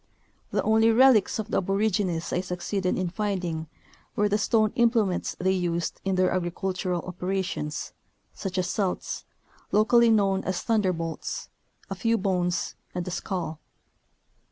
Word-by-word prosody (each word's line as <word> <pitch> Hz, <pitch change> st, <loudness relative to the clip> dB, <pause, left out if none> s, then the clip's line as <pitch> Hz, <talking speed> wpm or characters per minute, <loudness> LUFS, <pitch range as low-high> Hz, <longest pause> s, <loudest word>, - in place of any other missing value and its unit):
The -, -, 0 dB
only 220 Hz, +1 st, +4 dB
relics 235 Hz, -3 st, +5 dB
of 220 Hz, 0 st, -4 dB
the -, -, +2 dB
aborigines 195 Hz, -3 st, 0 dB
I 180 Hz, -, +1 dB
succeeded 185 Hz, +1 st, -2 dB
in 185 Hz, -1 st, -1 dB
finding 180 Hz, -6 st, -2 dB, 0.5 s
were 210 Hz, -, +3 dB
the 205 Hz, +1 st, +1 dB
stone 215 Hz, 0 st, +2 dB
implements 230 Hz, -6 st, +2 dB
they 190 Hz, +1 st, +2 dB
used 175 Hz, -2 st, -1 dB
in 195 Hz, -1 st, 0 dB
their 185 Hz, 0 st, +3 dB
agricultural 180 Hz, 0 st, -2 dB
operations, 185 Hz, -4 st, -3 dB, 0.4 s
such 190 Hz, -1 st, -5 dB
as 180 Hz, -1 st, +1 dB
celts, 190 Hz, 0 st, -2 dB, 0.5 s
locally 235 Hz, +2 st, +5 dB
known 195 Hz, -3 st, +3 dB
as 185 Hz, -1 st, -2 dB
"thunderbolts," 185 Hz, -7 st, -1 dB, 0.4 s
a -, -, -4 dB
few 230 Hz, -1 st, +1 dB
bones, 180 Hz, -3 st, 0 dB, 0.2 s
and 180 Hz, 0 st, -3 dB
a -, -, -3 dB
skull. 175 Hz, -3 st, -3 dB
190 Hz, 135 wpm, -26 LUFS, 180-215 Hz, 0.5 s, relics